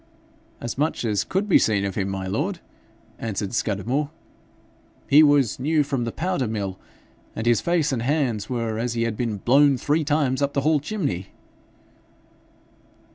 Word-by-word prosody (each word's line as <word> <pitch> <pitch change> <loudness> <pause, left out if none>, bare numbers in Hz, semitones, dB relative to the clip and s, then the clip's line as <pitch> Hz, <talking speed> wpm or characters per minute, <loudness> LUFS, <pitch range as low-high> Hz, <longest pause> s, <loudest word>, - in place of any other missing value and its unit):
'As 120 +3 -5
much 150 -4 0
as 105 -3 +1
could 195 +3 -1
be 195 - +6
seen 100 -3 +1
of 100 - -2
him, 95 0 -2
my 95 -1 -4
lord,' 150 - -2 0.6
answered 105 -2 -3
Scudamore. 120 +7 -1 1.0
'He 145 +2 +7
was 145 -7 +3
new 150 +3 +2
from 135 -4 -2
the 115 - -3
powder 175 -5 -1
mill, 100 -4 -4 0.6
and 110 - -4
his 120 -1 +3
face 170 -4 +1
and 125 -4 -1
hands 125 -5 0
were 115 -3 -2
as 120 0 -1
he 115 -1 0
had 115 -2 -1
been 115 -2 -2
blown 140 +6 +4
three 150 +5 +1
times 145 -3 +1
up 140 0 0
the 140 - +1
hall 155 +1 +3
chimney.' 140 - -3
125 Hz, 165 wpm, -23 LUFS, 110-150 Hz, 1.0 s, He